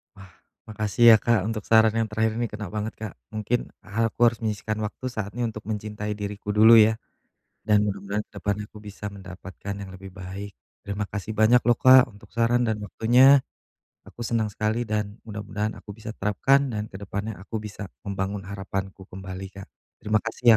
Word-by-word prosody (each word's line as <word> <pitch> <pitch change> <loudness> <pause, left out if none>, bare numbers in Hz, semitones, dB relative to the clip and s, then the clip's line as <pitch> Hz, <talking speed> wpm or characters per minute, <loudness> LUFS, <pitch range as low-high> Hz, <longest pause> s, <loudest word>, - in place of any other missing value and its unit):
Wah 95 -2 -14 0.4
makasih 110 +1 -1
ya, - - +5
Kak, 115 -3 +2
untuk 110 -2 -3
saran 110 -1 +5
yang 115 -1 +1
terakhir 110 0 +1
ini 120 - 0
kena 105 -1 -5
banget, 110 +1 -3
Kak, 110 -3 -5 0.2
mungkin 110 +3 0 0.2
ha 110 +4 0
aku - - -47
harus 115 -1 0
menyisihkan 110 0 -2
waktu 105 +4 -7
saatnya 110 +1 -4
untuk 105 -1 -9
mencintai 105 -1 -4
diriku 105 0 -6
dulu 110 +2 +8
ya? 110 +1 +5 0.7
Dan 105 -1 +4
mudah-mudahan 100 +1 -3
ke - - -57
depan 100 0 0
aku - - -14
bisa 105 0 -9
mendapatkan 95 0 -8
yang 100 -1 -8
lebih 95 +1 -10
baik. 100 +1 -7 0.3
Terima 100 +1 -3
kasih 105 +2 -5
banyak 110 +3 +6
loh, 120 - +5
Kak 130 0 +7
untuk 105 -2 -17
saran 115 +1 +2
dan 110 -2 -1
waktunya 125 +7 +5 0.7
aku - - -17
senang 110 -2 0
sekali 110 +3 -1
dan 105 -2 -2
mudah-mudahan 105 0 -4
aku 105 - -10
bisa 110 0 -7
terapkan 135 +8 +2
dan 105 -1 -2
ke 95 - -8
depannya 100 +2 -5
aku 100 +4 -8
bisa 105 -1 -7 0.2
membangun 100 0 -3
harapanku 95 0 -5
kembali, 95 0 -7
Kak. 95 0 -10 0.4
Terima 105 0 +2
kasih 115 +2 -7
105 Hz, 180 wpm, -25 LUFS, 100-110 Hz, 0.7 s, dulu